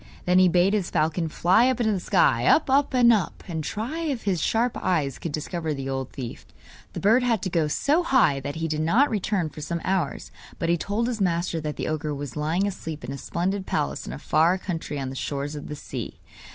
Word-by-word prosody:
Then 180 +1 +4
he 185 - +6
bade 180 +3 +3
his 200 -5 0
falcon 160 +2 0
fly 190 +11 +4
up 255 - -1
into 220 -2 +2
the 195 - 0
sky 135 - +2
up, 295 - +4
up, 280 +1 +3
and 240 -2 +6
up 205 -5 -1
and 160 -3 -3
try 230 - -4
if 290 -8 -2
his 185 -5 0
sharp 235 +2 +1
eyes 150 -7 0
could 165 - -4
discover 155 +1 -3
the 135 -1 -5
old 135 -1 -3
thief. 125 -4 -7 0.5
The - - -4
bird 225 +6 +4
had 235 -5 +1
to 185 - -2
go 165 -3 +2
so 285 - +2
high 250 - +3
that 140 +2 -5
he 165 0 -2
did 155 -1 -1
not 230 - +3
return 200 -4 0
for 150 - -10
some 170 +3 -3
hours; 185 -6 -1 0.3
but 165 - -2
he 170 - +4
told 210 +7 -1
his 235 -4 -3
master 170 -2 0
that 150 -1 -4
the - - -3
ogre 155 -1 -2
was 140 -2 -6
lying 160 +6 0
asleep 165 -6 -5
in - - -5
a 140 - -5
splendid 190 +6 -2
palace 70 0 -2
in - - -5
a - - -6
far 170 +4 +2
country 165 -6 -4
on 135 -1 -3
the - - -7
shores 140 +2 -3
of 145 -1 -7
the 150 - -5
sea. - - -7
170 Hz, 235 wpm, -25 LUFS, 150-210 Hz, 0.5 s, he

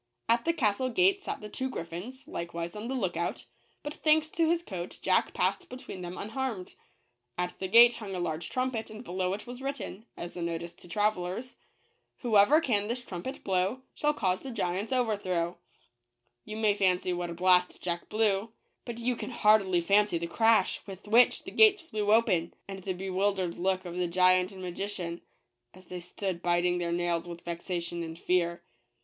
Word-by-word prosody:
At 235 0 +2
the 335 - +3
castle 255 -4 +1
gate 375 +9 +3
sat - - -5
the 210 - -6
two 260 +5 -3
griffins, 205 +6 -7
likewise 170 +1 -5
on 210 +2 -5
the 265 - -2
look 190 -8 -1
out; 170 - -3 0.4
but 295 - -4
thanks 310 0 +2
to 330 -1 +2
his 340 0 +1
coat 180 - -6
Jack - - +2
passed 365 -2 0
between 250 -7 -8
them 175 0 -6
unharmed. 225 -3 -4 0.6
At 180 0 -3
the 190 - -2
gate 235 +4 +7
hung 200 -4 -6
a - - -3
large 165 -1 -3
trumpet, 255 -3 -2
and 220 +2 -9
below 185 -2 -1
it 205 - -6
was 245 +1 -8
written, 270 -6 -5
as 175 - -6
a 175 - -5
notice 170 0 -3
to 175 - -15
travelers 205 +4 -1 0.3
" - - -45
Whoever 235 +5 +5
can 210 -8 +1
this 245 +2 -3
trumpet 195 +9 -6
blow, 190 +6 0
Shall 295 0 0
cause 185 -6 0
the 270 - -7
giant's 205 -1 -2
overthrow/' 190 -8 0 0.9
You 215 - -6
may 215 -2 +3
fancy 185 -2 +1
what 175 0 -3
a 170 - -5
blast 180 0 +3
Jack 175 -1 -3
blew; 215 -1 +1 0.4
but 235 -2 -5
you 240 +1 0
can - - -6
hardly 210 -6 +4
fancy 200 +1 +3
the 170 - -3
crash 225 +5 +3
with 195 +1 -10
which 235 +4 +5
the - - -8
gates 415 -4 +6
flew 210 -9 -1
open; 180 -7 +3
and 195 -1 -6
the 190 0 -3
be 190 +1 -5
wildered 190 -2 0
look 185 +1 0
of 175 -1 -6
the 180 -1 +1
giant 185 +1 +4
and 190 -1 -9
magician, 180 -1 -4 0.5
as 185 0 -16
they 180 0 -6
stood 180 0 -4
biting 175 0 +2
their 170 -1 -1
nails 175 0 0
with 170 0 -8
vexation 170 0 -4
and 165 -1 -6
fear. 170 -1 0
195 Hz, 190 wpm, -29 LUFS, 175-235 Hz, 0.9 s, gate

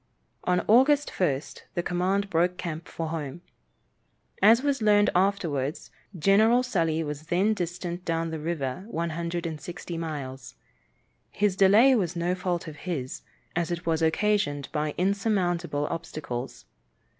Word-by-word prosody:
On 180 0 +2
August 280 +6 +5
1st 145 -6 -1
the 175 - 0
command 190 +3 0
broke 175 +2 +2
camp 165 -3 -5
for 165 -1 -4
home. 155 -1 -5 1.0
As 225 +5 +6
was 280 -3 0
learned 210 -1 +4
afterwards, 170 -7 0 0.3
General 215 +8 +4
Sully 165 -9 0
was 150 0 -6
then 190 +6 +2
distant 175 -1 -4
down 165 -1 -1
the 160 - -4
river 150 -1 -3
160 170 -2 -4
miles. 135 -6 -6 0.7
His 205 -2 +1
delay 205 +8 +6
was 180 -8 0
no 170 +1 0
fault 180 -2 -2
of 150 -1 -8
his, 135 -8 -3 0.3
as 170 0 0
it 175 0 -4
was 165 -1 +1
occasioned 160 -4 +1
by 150 -1 -2
insurmountable 180 -6 0
obstacles. 150 -6 -5
175 Hz, 130 wpm, -27 LUFS, 160-195 Hz, 1.0 s, As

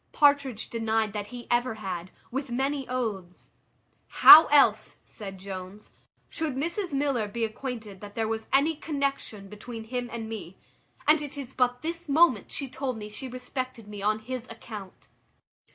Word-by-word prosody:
Partridge 285 -6 +3
denied 225 -2 0
that 205 -1 -4
he 245 0 -9
ever 240 -1 +2
had, 185 -4 -5 0.2
with 270 +2 -3
many 270 +2 -1
oaths. 210 -8 -4 0.6
"How 315 +2 +10
else," 290 -1 +4
said 195 -3 -8
Jones, 190 +1 -8 0.4
"should 315 -5 -2
Mrs 340 +7 -2
Miller 275 -6 0
be 225 +3 -1
acquainted 220 -4 -6
that 205 0 -10
there 225 -1 0
was 220 0 -3
any 295 +4 +3
connexion 275 -9 -3
between 220 +3 -8
him 245 +2 -4
and 230 -1 -5
me? 200 -5 -7 0.5
And 305 0 +6
it 290 -1 -7
is 265 -2 -7
but 250 +1 +1
this 335 0 -5
moment 285 - +4
she 275 - -3
told 260 -2 -4
me 210 -1 -7
she 215 +5 -6
respected 255 -2 -5
me 205 -1 -7
on 215 +1 +2
his 250 +2 -6
account." 215 -4 -10
240 Hz, 160 wpm, -27 LUFS, 210-275 Hz, 0.6 s, How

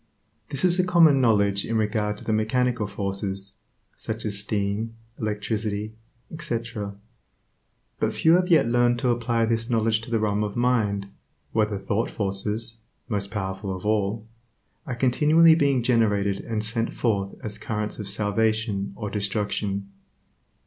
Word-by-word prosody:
This 140 +6 -1
is 180 0 +3
a - - +5
common 165 -6 +5
knowledge 100 -4 +3
in 115 - -1
regard 105 -1 0
to - - -12
the 110 - -1
mechanical 115 +1 +1
forces, 100 0 -4 0.4
such 110 +1 -5
as 100 -2 -1
steam, 105 +2 -2 0.2
electricity, 105 0 -2 0.4
etc., 115 -8 -4 1.0
but - - +1
few 160 - +3
have 180 +1 +4
yet 165 -9 +4
learned 120 0 +3
to 125 +1 0
apply 115 -1 +1
this 115 +1 -1
knowledge 110 -1 +2
to 115 - -8
the 115 - +1
realm 105 -1 0
of 105 -1 -4
mind, 110 -5 +1 0.4
where 110 -1 +2
the 105 -2 -3
thought 100 +4 -1
forces 105 +3 -1 0.3
(most 100 -3 -1
powerful 95 -1 -3
of 90 - -11
all) 105 +1 0 0.6
are 125 - -3
continually 150 +7 +5
being 140 -6 +2
generated 105 -5 +2
and 110 -1 -2
sent 115 +1 -1
forth 100 -4 0
as 105 -1 -2
currents 105 -1 -3
of 105 -2 -5
salvation 105 0 0
or 105 -3 -5
destruction. 100 -1 -2
110 Hz, 150 wpm, -25 LUFS, 100-115 Hz, 1.0 s, a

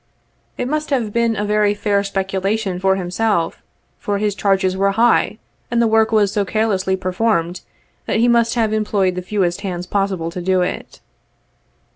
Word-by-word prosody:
It 245 - -2
must 305 +2 -2
have 240 -7 -1
been 235 -1 +1
a 210 - -2
very 210 0 +2
fair 205 -1 +1
specu 195 -1 -2
lation 195 -2 -1
for 190 0 +3
him, 180 -2 -4 0.9
for 205 -1 -2
his 210 0 0
charges 195 -1 +1
were 195 +1 +1
high, 235 +3 +2 0.3
and 235 - 0
the 235 - +4
work 220 0 +3
was 210 -3 +3
so 205 - +1
carelessly 195 -2 0
performed, 185 -2 -1 0.5
that - - 0
he 235 +2 +3
must 235 -1 +3
have 220 -2 +1
employed 205 -3 +1
the 180 - -4
fewest 185 -1 -1
hands 180 -3 -4
possible 190 -3 -1
to 180 - -5
do 185 +1 +1
it. - - -5
200 Hz, 175 wpm, -19 LUFS, 190-220 Hz, 0.9 s, the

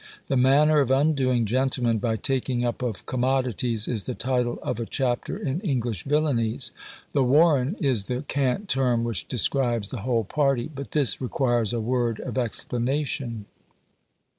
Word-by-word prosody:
"The 135 - +1
Manner 145 +4 +5
of 135 -3 +2
undoing 135 -4 +2
Gentlemen 125 -1 +1
by 110 +1 0
taking 125 0 -1
up 120 +1 -2
of 120 -6 -4
Commodities," 125 -3 0
is 110 -5 -2
the 125 - -3
title 125 -2 -1
of - - -2
a 115 - -2
chapter 125 -3 -1
in 140 +3 -2
"English 120 - -2
Villanies." 130 -5 0 0.4
The 140 - +2
"warren" 145 +3 +4
is 130 - +1
the 125 +5 -3
cant 140 +7 -1
term 125 -6 +2
which 115 -6 -2
describes 120 -4 +1
the 125 - -6
whole 115 0 0
party; 135 +3 0
but 140 0 -7
this 145 -4 +1
requires 120 -4 0
a 120 - -1
word 120 -1 0
of - - -3
explanation. 125 0 -2
125 Hz, 155 wpm, -25 LUFS, 120-135 Hz, 0.4 s, Manner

